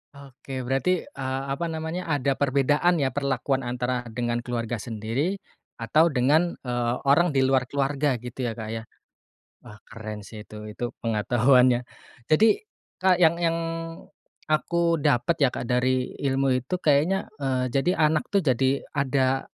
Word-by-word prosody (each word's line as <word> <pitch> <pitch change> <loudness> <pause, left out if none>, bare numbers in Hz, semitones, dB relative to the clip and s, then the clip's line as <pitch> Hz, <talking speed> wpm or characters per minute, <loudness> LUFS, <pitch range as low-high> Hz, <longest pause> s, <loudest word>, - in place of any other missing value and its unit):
Oke, 135 -1 -8
berarti, 135 +8 0
eee, 135 0 -4
apa 170 +4 -2
namanya 160 +2 -4
ada 140 -3 +1
perbedaan 145 +5 +2
ya 135 -5 0
perlakuan 135 -1 -1
antara 125 -1 -3
dengan 120 +1 -2
keluarga 120 -1 -3
sendiri 115 - -2 0.4
atau 155 +9 +3
dengan, 150 +5 +2
eee, 120 -1 -1
orang 145 +2 +3
di 135 - +4
luar 130 -1 +2
keluarga 140 0 0
gitu 125 +1 -5
ya 115 - -4
Kak, 110 -2 -6
ya. 115 0 -4 0.8
Wah 105 - -13
keren 110 -2 -8
sih 110 0 -10
itu, 110 - -11 0.2
itu 120 - -5 0.2
pengetahuannya. 120 +3 +3 0.5
Jadi, 225 - +4 0.3
Kak, 185 -1 +2
yang 165 0 +5
yang 165 -1 0 0.9
aku 170 +2 +1
dapet 140 +3 +1
ya - - +5
Kak, 115 - -5
dari 125 +1 0
ilmu 135 0 0 0.2
itu 180 - -3
kayaknya, 155 +7 +2
eee, 130 -3 -1
jadi 135 +8 +1 0.2
anak 155 -1 0
tuh 200 - +4
jadi 135 -2 +1
ada 135 -1 +1
135 Hz, 145 wpm, -25 LUFS, 125-155 Hz, 0.9 s, yang